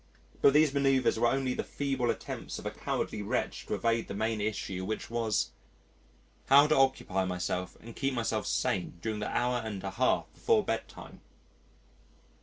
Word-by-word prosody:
But 140 Hz, -, +6 dB
these 150 Hz, -1 st, +5 dB
manœuvres 135 Hz, -4 st, +2 dB
were 120 Hz, -, +4 dB
only 130 Hz, 0 st, +1 dB
the -, -, -2 dB
feeble 135 Hz, -4 st, -1 dB
attempts -, -, -4 dB
of -, -, -9 dB
a -, -, -2 dB
cowardly -, -, -3 dB
wretch 100 Hz, -, -2 dB
to -, -, -1 dB
evade 115 Hz, 0 st, 0 dB
the 100 Hz, -, -5 dB
main 110 Hz, +1 st, -1 dB
issue 100 Hz, -3 st, -3 dB
which 110 Hz, +3 st, -4 dB
was: 115 Hz, -3 st, 0 dB, 1.0 s
How 140 Hz, +2 st, +8 dB
to 155 Hz, -, +3 dB
occupy 130 Hz, -8 st, +2 dB
myself 90 Hz, 0 st, -3 dB
and 115 Hz, 0 st, -11 dB
keep 135 Hz, -1 st, -1 dB
myself 115 Hz, -1 st, -1 dB
sane 90 Hz, -2 st, -1 dB
during 110 Hz, -1 st, -2 dB
the 105 Hz, -, -3 dB
hour 125 Hz, 0 st, +1 dB
and 105 Hz, -4 st, -5 dB
a 95 Hz, -, -3 dB
half 125 Hz, +6 st, +2 dB
before 445 Hz, -2 st, +2 dB
bedtime. -, -, -5 dB
115 Hz, 170 wpm, -30 LUFS, 105-135 Hz, 1.0 s, How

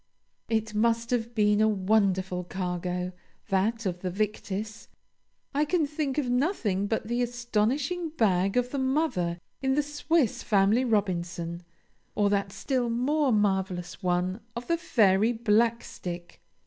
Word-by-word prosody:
It 220 Hz, -1 st, 0 dB
must 230 Hz, +2 st, +1 dB
have 235 Hz, -1 st, -1 dB
been 210 Hz, -1 st, +3 dB
a 220 Hz, -, +5 dB
wonderful 190 Hz, -3 st, +1 dB
cargo, 180 Hz, 0 st, -3 dB, 0.4 s
that 215 Hz, +4 st, +1 dB
of 180 Hz, -2 st, -2 dB
the 185 Hz, -, -3 dB
Victis; 210 Hz, +2 st, -3 dB, 0.7 s
I 290 Hz, +2 st, +2 dB
can 315 Hz, +1 st, +1 dB
think 290 Hz, -2 st, -3 dB
of 290 Hz, -4 st, 0 dB
nothing 245 Hz, -, 0 dB
but 220 Hz, 0 st, -2 dB
the 240 Hz, +1 st, 0 dB
astonishing 245 Hz, +8 st, 0 dB
bag 195 Hz, -, +1 dB
of 250 Hz, 0 st, +1 dB
the 280 Hz, -, -2 dB
Mother 260 Hz, -, 0 dB, 0.2 s
in 265 Hz, -1 st, +1 dB
the 295 Hz, -, +2 dB
"Swiss 295 Hz, -2 st, 0 dB
Family 205 Hz, +4 st, +3 dB
Robinson," 175 Hz, -6 st, -1 dB, 0.5 s
or 205 Hz, -1 st, +2 dB
that 200 Hz, -1 st, 0 dB
still 250 Hz, +2 st, -1 dB
more 270 Hz, +4 st, +1 dB
marvelous 190 Hz, -4 st, 0 dB
one 180 Hz, +2 st, 0 dB, 0.2 s
of 235 Hz, +1 st, -5 dB
the 335 Hz, -, +2 dB
Fairy 215 Hz, -, +3 dB
Blackstick. 220 Hz, -6 st, -1 dB
215 Hz, 135 wpm, -28 LUFS, 190-245 Hz, 0.7 s, a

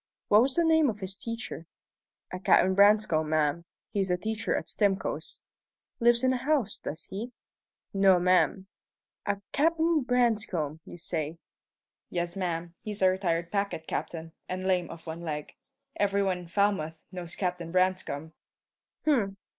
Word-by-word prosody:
"What 210 Hz, +1 st, +7 dB
was 260 Hz, +2 st, +1 dB
the 340 Hz, -, +3 dB
name 320 Hz, -3 st, +4 dB
of 215 Hz, -, -3 dB
his 190 Hz, -1 st, -5 dB
teacher?" 230 Hz, -7 st, -6 dB, 0.7 s
"A 185 Hz, -, -3 dB
Captain 190 Hz, 0 st, +4 dB
Branscome, 200 Hz, -6 st, +4 dB
ma'am. 155 Hz, +1 st, +1 dB, 0.3 s
He's 195 Hz, -2 st, 0 dB
a 180 Hz, -, +2 dB
teacher 220 Hz, +3 st, -1 dB
at -, -, -3 dB
Stimcoe's." 200 Hz, -3 st, -1 dB, 0.6 s
"Lives 235 Hz, 0 st, +4 dB
in 260 Hz, -, +4 dB
the 260 Hz, -, +1 dB
house, 280 Hz, -3 st, 0 dB
does 160 Hz, +2 st, -6 dB
he?" 225 Hz, +6 st, -5 dB, 0.6 s
"No, 195 Hz, -2 st, +5 dB
ma'am." 185 Hz, +2 st, +3 dB, 0.6 s
"A 200 Hz, -1 st, 0 dB
Captain 325 Hz, +1 st, +2 dB
Branscome, 215 Hz, -, +1 dB
you -, -, -10 dB
say?" 165 Hz, -2 st, -3 dB, 0.7 s
"Yes, 175 Hz, 0 st, -2 dB
ma'am. 170 Hz, -3 st, -3 dB
He's 210 Hz, -2 st, -3 dB
a 185 Hz, -, +6 dB
retired 170 Hz, -3 st, -1 dB
packet 200 Hz, -5 st, -1 dB
captain, 165 Hz, 0 st, -4 dB, 0.2 s
and 185 Hz, +1 st, -3 dB
lame 180 Hz, -2 st, +1 dB
of 165 Hz, -1 st, -10 dB
one 165 Hz, +1 st, -6 dB
leg. 150 Hz, -3 st, -5 dB, 0.4 s
Every 200 Hz, 0 st, +2 dB
one 185 Hz, -2 st, 0 dB
in 175 Hz, -, -10 dB
Falmouth 170 Hz, -4 st, 0 dB
knows 175 Hz, -2 st, -6 dB
Captain 180 Hz, -3 st, -2 dB
Branscome." 185 Hz, -4 st, 0 dB, 0.7 s
"H'm! 220 Hz, -10 st, +2 dB
190 Hz, 150 wpm, -29 LUFS, 170-215 Hz, 0.7 s, What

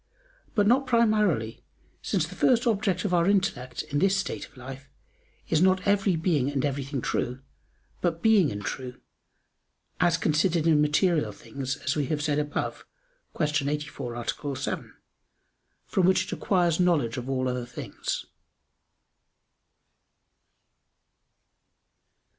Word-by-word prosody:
But 205 Hz, -2 st, +3 dB
not 260 Hz, +5 st, +3 dB
primarily, 210 Hz, -, +2 dB, 0.4 s
since 180 Hz, -6 st, 0 dB
the 170 Hz, -, -10 dB
first 240 Hz, +4 st, +3 dB
object 200 Hz, -5 st, +1 dB
of 190 Hz, -, 0 dB
our 170 Hz, 0 st, +3 dB
intellect, 130 Hz, -11 st, 0 dB
in 145 Hz, -, -2 dB
this 195 Hz, +3 st, +3 dB
state 195 Hz, -2 st, -3 dB
of 145 Hz, -, -24 dB
life, 135 Hz, +2 st, -9 dB, 0.6 s
is 160 Hz, -1 st, +2 dB
not 185 Hz, 0 st, +3 dB
every 200 Hz, -2 st, +3 dB
being 160 Hz, -5 st, +1 dB
and 140 Hz, -1 st, 0 dB
everything 140 Hz, -1 st, -2 dB
true, 125 Hz, +3 st, -2 dB, 0.6 s
but 170 Hz, -2 st, 0 dB
being 210 Hz, -8 st, +5 dB
and 105 Hz, 0 st, -6 dB
true, 125 Hz, -2 st, -5 dB, 1.0 s
as 175 Hz, -1 st, +3 dB
considered 165 Hz, +1 st, +1 dB
in 155 Hz, -3 st, +4 dB
material 150 Hz, +2 st, +2 dB
things, 135 Hz, -1 st, -5 dB
as -, -, -2 dB
we 145 Hz, -3 st, 0 dB
have 150 Hz, 0 st, -1 dB
said 150 Hz, -1 st, +1 dB
above 150 Hz, -1 st, -3 dB, 0.5 s
(Q. 150 Hz, -2 st, +1 dB
84, 145 Hz, -5 st, -4 dB
A. 135 Hz, +4 st, -3 dB
7), -, -, -4 dB, 0.9 s
from 185 Hz, -2 st, +2 dB
which 185 Hz, 0 st, +4 dB
it 195 Hz, -, -8 dB
acquires 175 Hz, -4 st, +1 dB
knowledge 155 Hz, -10 st, +2 dB
of 125 Hz, +1 st, -5 dB
all 130 Hz, -1 st, 0 dB
other 125 Hz, -1 st, -2 dB
things. 120 Hz, -, -5 dB
155 Hz, 130 wpm, -27 LUFS, 135-185 Hz, 1.0 s, being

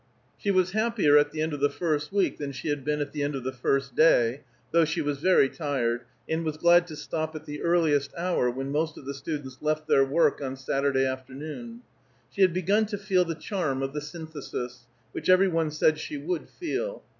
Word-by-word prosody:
She 205 Hz, -, -2 dB
was 185 Hz, -1 st, +3 dB
happier 215 Hz, -8 st, +3 dB
at 145 Hz, 0 st, +5 dB
the 155 Hz, 0 st, -2 dB
end 160 Hz, -1 st, -2 dB
of 145 Hz, -, -4 dB
the 145 Hz, +1 st, +3 dB
first 150 Hz, -3 st, -1 dB
week 200 Hz, -1 st, +1 dB
than 145 Hz, -1 st, -3 dB
she 135 Hz, +4 st, -5 dB
had 145 Hz, -2 st, -1 dB
been 150 Hz, +1 st, -1 dB
at 145 Hz, -, -3 dB
the 150 Hz, -, -4 dB
end 145 Hz, 0 st, -1 dB
of 135 Hz, -, -4 dB
the 130 Hz, -, -2 dB
first 135 Hz, +1 st, -1 dB
day, 130 Hz, -5 st, +4 dB, 0.3 s
though 170 Hz, 0 st, +5 dB
she 160 Hz, +2 st, -1 dB
was 145 Hz, -2 st, -1 dB
very 180 Hz, -4 st, +5 dB
tired, 125 Hz, -6 st, -2 dB, 0.2 s
and 160 Hz, +1 st, -1 dB
was 155 Hz, -1 st, -3 dB
glad 175 Hz, +1 st, +5 dB
to 155 Hz, -, -8 dB
stop 155 Hz, +1 st, -4 dB
at 155 Hz, 0 st, -7 dB
the 150 Hz, -1 st, -6 dB
earlier 170 Hz, -4 st, +3 dB, 0.2 s
hour 170 Hz, -7 st, +1 dB
when 135 Hz, +3 st, -4 dB
most 155 Hz, +2 st, -1 dB
of -, -, -11 dB
the 140 Hz, -, -4 dB
students 140 Hz, -2 st, -6 dB
left 155 Hz, 0 st, -1 dB
their 135 Hz, -, +5 dB
work 145 Hz, +2 st, +2 dB
on 135 Hz, -1 st, -3 dB
Saturday 135 Hz, 0 st, +1 dB
afternoon. 145 Hz, -, -6 dB, 0.5 s
She 200 Hz, -, -3 dB
had 185 Hz, -2 st, +6 dB
begun 195 Hz, +5 st, +2 dB
to 205 Hz, -1 st, -4 dB
feel 190 Hz, -2 st, +2 dB
the 165 Hz, -1 st, -3 dB
charm 155 Hz, -6 st, -2 dB
of 135 Hz, 0 st, -3 dB
the 150 Hz, -, -3 dB
Synthesis, 145 Hz, -6 st, -7 dB, 0.2 s
which -, -, -4 dB
every 185 Hz, +1 st, +6 dB
one 165 Hz, -3 st, 0 dB
said 155 Hz, 0 st, +2 dB
she 300 Hz, -, -5 dB
would 355 Hz, +5 st, -3 dB
feel. -, -, -4 dB
155 Hz, 220 wpm, -27 LUFS, 140-175 Hz, 0.5 s, had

